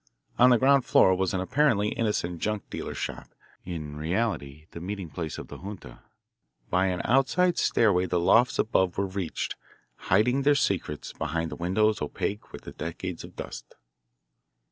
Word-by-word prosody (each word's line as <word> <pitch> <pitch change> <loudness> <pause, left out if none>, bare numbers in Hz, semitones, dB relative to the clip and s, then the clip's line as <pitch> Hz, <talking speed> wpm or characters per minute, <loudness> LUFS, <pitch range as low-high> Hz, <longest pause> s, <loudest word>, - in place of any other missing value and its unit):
On 125 +1 +8
the 125 - +6
ground 135 +2 +4
floor 95 - +5
was 95 0 0
an 95 -2 -1
apparently 105 -1 +2
innocent 95 -7 -1
junk 105 -1 -2
dealer's - - -5
shop, - - -5 0.4
in 75 -4 -6
reality 80 -4 -2
the - - -8
meeting 95 -2 -5
place 80 +1 -5
of - - -7
the - - -10
junta. 100 +1 -9 0.7
By 95 +1 +3
an 90 -1 -1
outside 135 +8 +3
stairway 95 -5 +3
the 90 0 +1
lofts 120 +9 +4
above 95 -5 +1
were 100 - +1
reached, 95 -3 -3 0.5
hiding 125 +8 +3
their 145 +1 +4
secrets 90 - -1
behind 80 +1 -3
windows 105 +5 +1
opaque 100 +7 -3
with - - -10
decades 85 +2 -5
of - - -12
dust. - - -8
95 Hz, 155 wpm, -27 LUFS, 85-115 Hz, 0.7 s, On